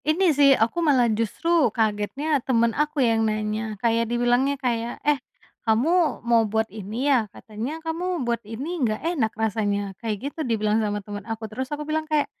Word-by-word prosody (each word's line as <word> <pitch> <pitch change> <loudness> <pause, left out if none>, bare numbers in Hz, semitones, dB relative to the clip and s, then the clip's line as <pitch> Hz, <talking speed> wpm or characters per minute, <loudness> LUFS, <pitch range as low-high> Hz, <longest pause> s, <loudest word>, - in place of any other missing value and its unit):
Ini 325 +2 +3
sih, 285 0 +5
aku 230 +10 +1
malah 275 -7 +4
justru 265 +7 +1
kagetnya 225 +7 0
temen 235 -2 +2
aku 295 -1 +1
yang 225 -1 +2
nanya. 215 0 -2
Kayak 230 +1 +1
dibilangnya 245 +4 +2
kayak, 240 -3 -2
"Eh, 295 -3 +2 0.4
kamu 295 +7 +2
mau 235 -1 +4
buat 220 +1 +1
ini, 215 +5 -4
ya? 250 -7 +3
Katanya 225 +10 -6
kamu 335 -2 -2
buat 235 -1 -1
ini 270 +11 -5
nggak 215 -4 +1 0.2
enak 240 -10 +1
rasanya?" 205 -2 -1
kayak 230 +5 -3
gitu - - -13
dibilang 220 -4 +1
sama 205 -2 -2
temen 205 -1 -6
aku. 225 0 -4
Terus 255 +5 -5
aku 300 0 -4
bilang, 310 +1 -2
kayak, 305 -1 +2
235 Hz, 175 wpm, -24 LUFS, 220-290 Hz, 0.4 s, sih